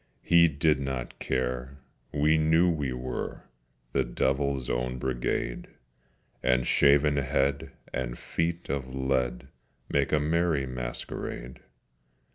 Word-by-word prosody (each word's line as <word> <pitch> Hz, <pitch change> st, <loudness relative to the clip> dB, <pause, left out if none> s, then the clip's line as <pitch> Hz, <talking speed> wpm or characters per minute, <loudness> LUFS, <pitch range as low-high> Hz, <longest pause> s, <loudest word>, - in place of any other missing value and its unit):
We 85 Hz, -1 st, +8 dB
did 75 Hz, -1 st, +2 dB
not 65 Hz, -3 st, -4 dB
care: 65 Hz, +1 st, -2 dB, 0.3 s
we 75 Hz, +2 st, +3 dB
knew 80 Hz, +3 st, +4 dB
we 75 Hz, -5 st, -2 dB
were 60 Hz, 0 st, -4 dB, 0.5 s
The -, -, +3 dB
Devil's 65 Hz, +2 st, 0 dB
Own 60 Hz, +1 st, -1 dB
Brigade: 60 Hz, -1 st, -2 dB, 0.7 s
And 65 Hz, 0 st, +2 dB
shaven 70 Hz, +2 st, +4 dB
head 70 Hz, 0 st, 0 dB, 0.2 s
and 60 Hz, -1 st, -3 dB
feet 85 Hz, +1 st, -2 dB
of 65 Hz, -2 st, -3 dB
lead 65 Hz, -1 st, -1 dB, 0.4 s
Make 70 Hz, -1 st, +1 dB
a 75 Hz, -, +4 dB
merry 80 Hz, -1 st, +1 dB
masquerade. 60 Hz, 0 st, -5 dB
65 Hz, 110 wpm, -28 LUFS, 65-75 Hz, 0.7 s, We